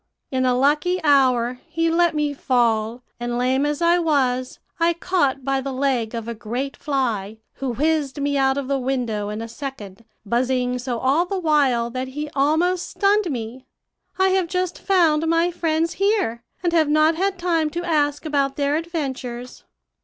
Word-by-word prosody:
In 260 Hz, -1 st, +1 dB
a 250 Hz, -, +3 dB
lucky 300 Hz, +7 st, +2 dB
hour 255 Hz, -4 st, +3 dB
he 330 Hz, +1 st, 0 dB
let 340 Hz, -1 st, +2 dB
me 300 Hz, -1 st, 0 dB
fall, 240 Hz, -3 st, 0 dB, 0.2 s
and, 240 Hz, 0 st, -2 dB
lame 260 Hz, +3 st, +1 dB
as 295 Hz, +3 st, -2 dB
I 340 Hz, +1 st, +4 dB
was, 260 Hz, -6 st, 0 dB, 0.2 s
I 335 Hz, +1 st, +3 dB
caught 320 Hz, -7 st, 0 dB
by 270 Hz, -1 st, 0 dB
the 275 Hz, +1 st, -4 dB
leg 255 Hz, -4 st, -1 dB
of 230 Hz, -1 st, -5 dB
a 235 Hz, -, -3 dB
great 240 Hz, +5 st, -4 dB
fly, 230 Hz, -8 st, -2 dB, 0.2 s
who 265 Hz, -3 st, -2 dB
whizzed 295 Hz, 0 st, 0 dB
me 285 Hz, 0 st, 0 dB
out 270 Hz, 0 st, +2 dB
of 280 Hz, -2 st, -3 dB
the 275 Hz, 0 st, 0 dB
window 245 Hz, -6 st, -2 dB
in 210 Hz, +2 st, -4 dB
a -, -, -6 dB
second, 230 Hz, -5 st, -8 dB, 0.2 s
buzzing 250 Hz, +2 st, 0 dB
so 245 Hz, -1 st, -3 dB
all 280 Hz, +9 st, +2 dB
the 390 Hz, -, -2 dB
while 280 Hz, -9 st, +2 dB
that 255 Hz, +1 st, -3 dB
he 295 Hz, +3 st, -5 dB
almost 330 Hz, +5 st, +1 dB
stunned 405 Hz, -2 st, +2 dB
me. 245 Hz, -1 st, -6 dB, 0.5 s
I 380 Hz, 0 st, +3 dB
have 375 Hz, -2 st, +1 dB
just 365 Hz, 0 st, -2 dB
found 325 Hz, -5 st, +2 dB
my 330 Hz, +2 st, +2 dB
friends 330 Hz, -1 st, 0 dB
here, 395 Hz, -, 0 dB, 0.2 s
and 345 Hz, -1 st, +1 dB
have 315 Hz, -3 st, +3 dB
not 310 Hz, +2 st, +4 dB
had 380 Hz, +3 st, -1 dB
time 335 Hz, -3 st, +1 dB
to 345 Hz, +3 st, -4 dB
ask 295 Hz, -2 st, 0 dB
about 280 Hz, -3 st, 0 dB
their 285 Hz, +1 st, +1 dB
adventures.' 265 Hz, -7 st, -5 dB
280 Hz, 175 wpm, -22 LUFS, 250-330 Hz, 0.5 s, I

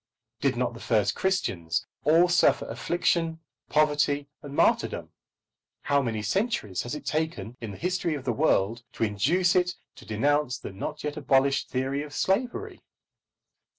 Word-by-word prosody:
Did 135 Hz, -3 st, +1 dB
not 125 Hz, -1 st, 0 dB
the 115 Hz, -, -10 dB
first 110 Hz, -3 st, +1 dB
Christians 95 Hz, -, -1 dB, 0.2 s
all 165 Hz, +4 st, +6 dB
suffer 175 Hz, 0 st, +3 dB
affliction, 165 Hz, -2 st, 0 dB, 0.3 s
poverty, 145 Hz, -1 st, +2 dB
and 145 Hz, -1 st, -8 dB
martyrdom? -, -, +1 dB, 0.7 s
How 140 Hz, 0 st, +2 dB
many 115 Hz, -4 st, -2 dB
centuries 190 Hz, -, -1 dB
has 120 Hz, +4 st, -4 dB
it 150 Hz, -, -8 dB
taken 150 Hz, -, -2 dB
in 115 Hz, -, -5 dB
the 100 Hz, -, -8 dB
history 180 Hz, -2 st, -1 dB
of 140 Hz, -, -6 dB
the 120 Hz, -, +1 dB
world 115 Hz, -5 st, +2 dB
to -, -, -2 dB
induce 170 Hz, -, +2 dB
it 180 Hz, 0 st, +2 dB, 0.2 s
to -, -, -13 dB
denounce 140 Hz, +4 st, +1 dB
the -, -, -8 dB
not 95 Hz, -, -5 dB
yet 150 Hz, +1 st, -3 dB
abolished 135 Hz, -1 st, +2 dB
theory 135 Hz, +2 st, -1 dB
of 145 Hz, -1 st, -8 dB
slavery? 260 Hz, -, -1 dB
145 Hz, 150 wpm, -27 LUFS, 120-170 Hz, 0.7 s, all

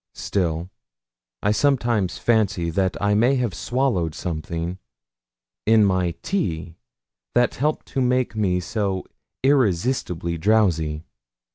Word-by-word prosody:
Still 85 Hz, -2 st, -2 dB, 0.7 s
I 105 Hz, -, +3 dB
sometimes 120 Hz, -6 st, +1 dB
fancy 105 Hz, -7 st, +1 dB
that 95 Hz, +2 st, 0 dB
I 105 Hz, 0 st, +2 dB
may 120 Hz, +6 st, +4 dB
have 120 Hz, -7 st, -1 dB
swallowed 100 Hz, -, 0 dB
something 85 Hz, +2 st, -4 dB, 0.9 s
in 110 Hz, -2 st, +6 dB
my 90 Hz, -3 st, +1 dB
tea 85 Hz, -, -2 dB, 0.6 s
that 120 Hz, 0 st, +3 dB
helped 150 Hz, +4 st, -1 dB
to 135 Hz, -, -1 dB
make 125 Hz, -2 st, +1 dB
me 95 Hz, -4 st, +1 dB
so 95 Hz, 0 st, -2 dB, 0.4 s
irresistibly 95 Hz, -, +1 dB
drowsy. 85 Hz, -7 st, +2 dB
100 Hz, 110 wpm, -23 LUFS, 85-120 Hz, 0.9 s, in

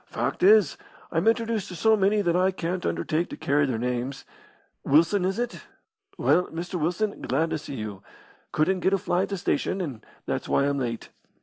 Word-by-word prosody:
"Fact -, -, -3 dB
is, 200 Hz, -3 st, +5 dB, 0.3 s
I'm 165 Hz, +4 st, 0 dB
introduced 225 Hz, -2 st, +1 dB
to 180 Hz, -, -8 dB
so 220 Hz, +7 st, +4 dB
many 205 Hz, +1 st, +2 dB
that 170 Hz, -2 st, +1 dB
I 185 Hz, +1 st, +3 dB
can't 180 Hz, -1 st, -3 dB
undertake 165 Hz, +3 st, -1 dB
to -, -, -7 dB
carry 145 Hz, 0 st, +2 dB
their 125 Hz, -4 st, -1 dB
names. 125 Hz, +3 st, -3 dB, 0.6 s
Wilson, 165 Hz, +7 st, +3 dB
is 190 Hz, +2 st, -1 dB
it? 240 Hz, 0 st, -3 dB, 0.6 s
Well, 180 Hz, -, +3 dB
Mr. 170 Hz, +1 st, -5 dB
Wilson, 180 Hz, +6 st, -1 dB
glad 160 Hz, +6 st, 0 dB
to -, -, -1 dB
see 140 Hz, -, -7 dB
you. 105 Hz, -4 st, -6 dB, 0.5 s
Couldn't 185 Hz, +5 st, +1 dB
get 190 Hz, +2 st, +1 dB
a -, -, +4 dB
fly 180 Hz, -1 st, 0 dB
at 195 Hz, -, -2 dB
the 200 Hz, -, -2 dB
station, 185 Hz, +1 st, -1 dB
and 140 Hz, -11 st, -5 dB, 0.2 s
that's -, -, -3 dB
why 140 Hz, -, +3 dB
I'm 140 Hz, 0 st, 0 dB
late." 115 Hz, -3 st, -4 dB
175 Hz, 195 wpm, -26 LUFS, 140-195 Hz, 0.6 s, is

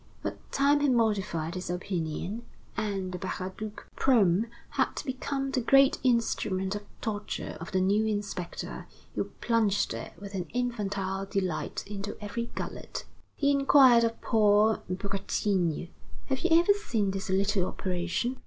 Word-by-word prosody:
But -, -, -6 dB
time 285 Hz, +1 st, +4 dB
had 290 Hz, -1 st, +3 dB
modified 205 Hz, -8 st, +1 dB
his 185 Hz, -1 st, -5 dB
opinion, 180 Hz, +3 st, -3 dB, 0.3 s
and 195 Hz, -3 st, -2 dB
the 180 Hz, -, -5 dB
Baraduc 200 Hz, +5 st, -5 dB
probe 220 Hz, -5 st, +4 dB, 0.2 s
had -, -, 0 dB
become 270 Hz, +1 st, -2 dB
the 265 Hz, -2 st, +1 dB
great 275 Hz, +3 st, +5 dB
instrument 205 Hz, -6 st, +1 dB
of 205 Hz, -, -3 dB, 0.2 s
torture 210 Hz, -2 st, -3 dB
of -, -, -7 dB
the 190 Hz, -2 st, +2 dB
new 205 Hz, +4 st, +3 dB
inspector, 205 Hz, -4 st, -4 dB, 0.3 s
who -, -, -1 dB
plunged 215 Hz, -4 st, +1 dB
it -, -, -6 dB
with 200 Hz, +2 st, -9 dB
an 180 Hz, -2 st, -3 dB
infantile 200 Hz, -5 st, -1 dB
delight 185 Hz, -5 st, -2 dB
into 205 Hz, 0 st, -5 dB
every 235 Hz, +3 st, -4 dB
gullet. -, -, -5 dB, 0.3 s
He 285 Hz, -1 st, +2 dB
inquired 275 Hz, -4 st, +6 dB
of 230 Hz, 0 st, 0 dB
Paul 215 Hz, -1 st, +4 dB
Bretigny: 190 Hz, -3 st, -1 dB, 0.4 s
"Have 265 Hz, -1 st, +1 dB
you 355 Hz, -, +1 dB
ever 350 Hz, +4 st, +5 dB
seen 225 Hz, -, -1 dB
this 195 Hz, 0 st, -4 dB
little 195 Hz, 0 st, +2 dB
operation?" 180 Hz, +7 st, -2 dB
205 Hz, 140 wpm, -29 LUFS, 190-235 Hz, 0.4 s, inquired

